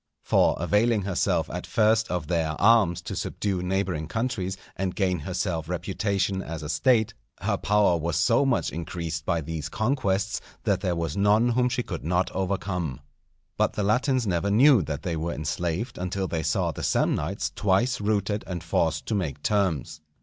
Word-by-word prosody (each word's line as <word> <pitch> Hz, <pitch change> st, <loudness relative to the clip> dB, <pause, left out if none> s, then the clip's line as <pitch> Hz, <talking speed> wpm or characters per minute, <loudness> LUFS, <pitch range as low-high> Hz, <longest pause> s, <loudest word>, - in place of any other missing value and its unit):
For -, -, +3 dB
availing 105 Hz, +5 st, +2 dB
herself 95 Hz, -2 st, 0 dB
at -, -, -5 dB
first 110 Hz, 0 st, +2 dB
of 90 Hz, -3 st, -2 dB
their 80 Hz, -2 st, -1 dB
arms 100 Hz, -6 st, +4 dB
to -, -, -5 dB
subdue 95 Hz, -3 st, -2 dB
neighbouring 90 Hz, -4 st, -1 dB
countries 110 Hz, -4 st, -2 dB, 0.2 s
and 95 Hz, -2 st, -2 dB
gain 90 Hz, -3 st, +1 dB
herself 85 Hz, -1 st, -3 dB
reputation 95 Hz, +1 st, -1 dB
as 80 Hz, -3 st, -6 dB
a 75 Hz, -, -5 dB
State, 110 Hz, -, +2 dB, 0.3 s
her -, -, +1 dB
power 105 Hz, -4 st, +2 dB
was 80 Hz, 0 st, -2 dB
so 115 Hz, +10 st, +3 dB
much 135 Hz, -3 st, +1 dB
increased 80 Hz, -1 st, -5 dB
by 85 Hz, -3 st, +1 dB
these 80 Hz, 0 st, -5 dB
conquests 110 Hz, -3 st, 0 dB, 0.2 s
that 100 Hz, -4 st, +1 dB
there 90 Hz, -3 st, 0 dB
was 80 Hz, -2 st, -2 dB
none 105 Hz, +4 st, +3 dB
whom 125 Hz, +1 st, +2 dB
she 125 Hz, 0 st, -1 dB
could 85 Hz, -7 st, -6 dB
not 90 Hz, +3 st, 0 dB
overcome. 90 Hz, -6 st, -2 dB, 0.6 s
But -, -, +2 dB
the 105 Hz, -, -2 dB
Latins 125 Hz, +4 st, +2 dB
never 95 Hz, 0 st, 0 dB
knew 125 Hz, +3 st, +6 dB
that 75 Hz, -3 st, -4 dB
they 85 Hz, -2 st, -2 dB
were 80 Hz, +2 st, -2 dB
enslaved 85 Hz, -, -3 dB
until 95 Hz, +1 st, -2 dB
they 80 Hz, -2 st, -2 dB
saw -, -, 0 dB
the -, -, -7 dB
Samnites 90 Hz, +8 st, 0 dB
twice 105 Hz, +5 st, +1 dB
routed 105 Hz, 0 st, 0 dB
and 90 Hz, -2 st, -4 dB
forced 80 Hz, -2 st, 0 dB
to -, -, -2 dB
make 90 Hz, -9 st, -2 dB
terms. 95 Hz, -8 st, 0 dB
95 Hz, 170 wpm, -26 LUFS, 85-105 Hz, 0.6 s, knew